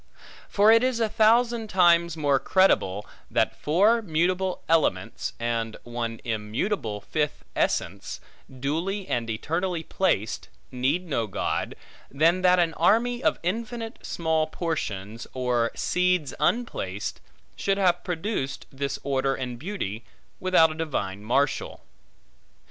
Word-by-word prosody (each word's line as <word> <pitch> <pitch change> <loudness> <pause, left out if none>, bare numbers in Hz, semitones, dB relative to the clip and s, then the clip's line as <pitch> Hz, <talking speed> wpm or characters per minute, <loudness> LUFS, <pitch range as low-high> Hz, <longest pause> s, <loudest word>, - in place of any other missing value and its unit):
For 205 +2 +5
it 230 +1 +6
is 255 -2 +1
a 225 - +2
thousand 225 +1 +3
times 170 -3 +4
more 145 -3 +2
credible, 105 - +2 0.2
that - - +1
four 205 +10 +3
mutable 185 +1 0
elements, 165 -1 +1
and 115 -1 -2
one 120 -1 -4
immutable 110 - -2
fifth 150 +7 -2
essence, - - -1 0.3
duly 165 +10 -3
and 115 -1 -1
eternally 165 +9 -2
placed, 160 - -1 0.2
need 135 +8 0
no 120 -8 -1
God, 95 - -2 0.3
than 165 +6 +3
that 180 0 +5
an 170 -2 +2
army 240 +8 +2
of - - +2
infinite 225 +4 -4
small 160 -2 0
portions, 115 - -4
or 125 -2 +1
seeds 180 -4 +1
unplaced, 105 - -1 0.3
should 195 0 0
have 180 -3 +2
produced 170 -5 -3
this 140 0 -3
order 135 -1 0
and 125 -2 -5
beauty, 125 - -4 0.4
without 180 -4 +4
a - - -4
divine 105 -12 -3
marshal. 135 +5 0
160 Hz, 120 wpm, -26 LUFS, 125-190 Hz, 0.4 s, it